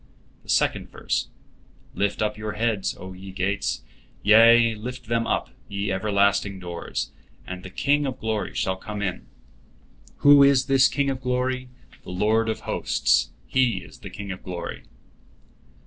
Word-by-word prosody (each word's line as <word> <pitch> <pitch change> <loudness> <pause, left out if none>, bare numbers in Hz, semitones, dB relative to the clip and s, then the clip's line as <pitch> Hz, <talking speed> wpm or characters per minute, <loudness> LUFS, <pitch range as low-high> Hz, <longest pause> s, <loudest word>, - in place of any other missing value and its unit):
The - - -21
second - - +1
verse: - - -2 0.7
"Lift 100 +1 0
up 105 0 -1
your 105 0 -5
heads, 110 -2 -1
O 95 +1 -9
ye 95 +1 -10
gates; 95 +2 -1 0.4
yea, 115 +2 +7
lift 125 +3 -7
them 115 -1 +1
up, - - -1 0.2
ye 100 0 -2
everlasting 100 0 +1
doors, 85 -2 -5 0.3
and 90 0 -6
the 95 - -9
King 145 +9 +1
of 130 - -4
glory 110 -2 -2
shall 95 0 0
come 105 +2 -5
in. 95 -3 -4 1.0
Who 145 0 +9
is 140 -1 +5
this 135 -1 +5
King 140 -1 0
of 130 -1 -5
glory? 125 0 -1 0.3
The - - -12
Lord 110 +5 +1
of 110 - -3
hosts, - - +1 0.2
He 130 -3 +1
is - - -14
the - - -9
King 100 -1 -7
of 95 - -7
glory." 90 -1 -6
105 Hz, 155 wpm, -24 LUFS, 95-125 Hz, 1.0 s, Who